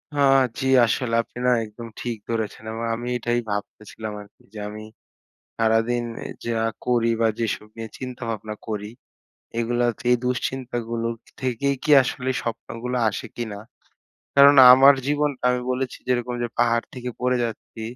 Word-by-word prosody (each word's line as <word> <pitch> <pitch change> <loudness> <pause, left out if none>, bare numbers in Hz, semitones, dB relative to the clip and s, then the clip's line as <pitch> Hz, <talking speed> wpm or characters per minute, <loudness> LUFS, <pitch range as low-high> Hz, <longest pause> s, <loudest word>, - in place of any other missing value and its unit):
হ্যাঁ, 135 -1 +5 0.2
জি - - -2 0.2
আসলে 115 +1 -1
আপনি 115 - -15
না - - +5
একদম 110 +2 -10
ঠিক 120 -2 -3
ধরেছেন 110 -2 -3
এবং 115 +1 -5
আমি 120 +1 -6
এটাই 120 0 0
ভাবতেছিলাম 105 +1 -5
আর 105 - -13
কি। - - -29
যে 110 - -7
আমি 105 +1 -8 0.7
সারাদিন 115 +2 +2 0.2
এ - - -4 0.2
যা 115 -1 -1 0.3
করি 120 -2 +2
বা 115 - +4
যেসব 110 -2 -2
নিয়ে 115 -1 -6
চিন্তাভাবনা 115 -4 -5
করি, 105 -1 -4 0.7
এগুলো 120 +1 0
হচ্ছে 115 0 -4
এই - - +3
দুশ্চিন্তাগুলো 120 -2 -2 0.3
থেকেই 130 +2 0
কি 150 - +1
আসলে 130 0 -3
স্বপ্নগুলো 115 +2 -4
আসে 100 - -6
কিনা? 110 -4 -5 0.8
কারণ 140 +1 +8 0.2
আমার 135 +2 +8
জীবনটা 145 -2 0
আমি 125 0 0
বলেছি 130 0 -2
যেরকম 125 -1 0
যে 120 - -1
পাহাড় 115 -1 +2
থেকে 125 -1 -5
পড়ে 125 0 +2
যাচ্ছি। 115 0 -7
120 Hz, 155 wpm, -23 LUFS, 115-125 Hz, 0.8 s, কারণ